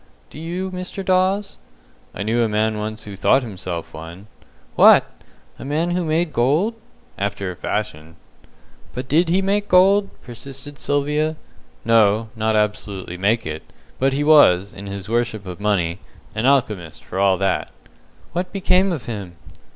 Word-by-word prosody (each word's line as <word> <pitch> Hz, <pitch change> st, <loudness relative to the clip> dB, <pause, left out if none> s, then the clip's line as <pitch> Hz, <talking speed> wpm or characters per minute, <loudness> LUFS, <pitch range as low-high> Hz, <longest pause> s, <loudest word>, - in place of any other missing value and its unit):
"Do -, -, -10 dB
you, 180 Hz, +4 st, -4 dB
Mr. 185 Hz, +1 st, -6 dB
Dawes?" 190 Hz, +2 st, +1 dB, 0.6 s
"I 100 Hz, -, -3 dB
knew 115 Hz, +3 st, +1 dB
a 115 Hz, -, +2 dB
man 110 Hz, 0 st, 0 dB
once 110 Hz, +1 st, -5 dB
who 100 Hz, -1 st, -8 dB
thought 130 Hz, +7 st, +3 dB
himself 90 Hz, -6 st, -6 dB
one." 85 Hz, +5 st, -9 dB, 0.5 s
"What! -, -, +7 dB, 0.5 s
A -, -, -7 dB
man 155 Hz, +5 st, -1 dB
who 180 Hz, 0 st, 0 dB
made 160 Hz, 0 st, 0 dB
gold?" 150 Hz, -, +2 dB, 0.5 s
"After 100 Hz, -1 st, -2 dB
a -, -, -9 dB
fashion." 80 Hz, -5 st, -4 dB, 0.8 s
"But 125 Hz, +1 st, -5 dB
did 165 Hz, +5 st, +3 dB
he 190 Hz, +3 st, +2 dB
make 205 Hz, +1 st, 0 dB
gold?" 195 Hz, +2 st, +5 dB
persisted 135 Hz, +4 st, -9 dB
Sylvia. 150 Hz, +2 st, 0 dB, 0.5 s
"No, 110 Hz, -1 st, +3 dB
not 110 Hz, 0 st, 0 dB
absolutely 105 Hz, -4 st, -2 dB
make 110 Hz, +5 st, +1 dB
it. 80 Hz, 0 st, -5 dB, 0.4 s
But 135 Hz, +1 st, +2 dB
he 145 Hz, +2 st, 0 dB
was, 100 Hz, -, +5 dB
in 100 Hz, +1 st, -9 dB
his 100 Hz, -1 st, -6 dB
worship 115 Hz, -3 st, -1 dB
of 90 Hz, 0 st, -7 dB
money, 95 Hz, -4 st, 0 dB, 0.3 s
an 110 Hz, +4 st, 0 dB
alchemist 105 Hz, -, 0 dB
for 95 Hz, -, -5 dB
all 95 Hz, -1 st, +4 dB
that." 95 Hz, 0 st, 0 dB, 0.6 s
"What 180 Hz, +1 st, -2 dB
became 190 Hz, -1 st, +2 dB
of 155 Hz, -8 st, -4 dB
him?" 100 Hz, -7 st, -6 dB
115 Hz, 155 wpm, -21 LUFS, 100-160 Hz, 0.8 s, What